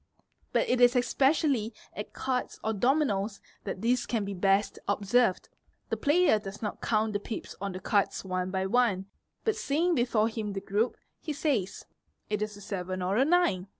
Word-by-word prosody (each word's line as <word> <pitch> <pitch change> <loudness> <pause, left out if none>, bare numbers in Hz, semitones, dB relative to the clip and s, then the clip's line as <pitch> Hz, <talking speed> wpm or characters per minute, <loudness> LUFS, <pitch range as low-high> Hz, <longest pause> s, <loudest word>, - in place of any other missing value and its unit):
But - - +2
it 250 0 +2
is 245 +1 +6
especially 260 -3 +2 0.2
at 210 - -6
cards 255 -1 -2
or 220 - 0
dominoes 220 -4 +1 0.3
that 190 - -5
this 240 +1 +2
can 225 -4 -1
be 200 - -4
best 195 +2 +1
observed; 200 0 +2 0.4
the - - 0
player 300 -6 +3
does 200 0 -8
not 210 - -4
count 215 -1 +1
the 205 - 0
pips 215 +2 -6
on 200 -1 -3
the 185 - -5
cards 200 0 0
one 185 0 -2
by 190 0 -1
one 195 -3 +2 0.4
but 440 -2 +2
seeing 330 +5 +1
before 240 -5 +2
him 220 -2 -4
the 195 - -2
group, 210 +5 0 0.2
he 305 - -4
says, 260 - -1 0.5
"It 210 -1 0
is 210 -1 -3
a - - -12
seven 185 -2 -4
or 190 +2 0
a 250 - +4
nine." 310 - +2
215 Hz, 185 wpm, -29 LUFS, 195-250 Hz, 0.5 s, is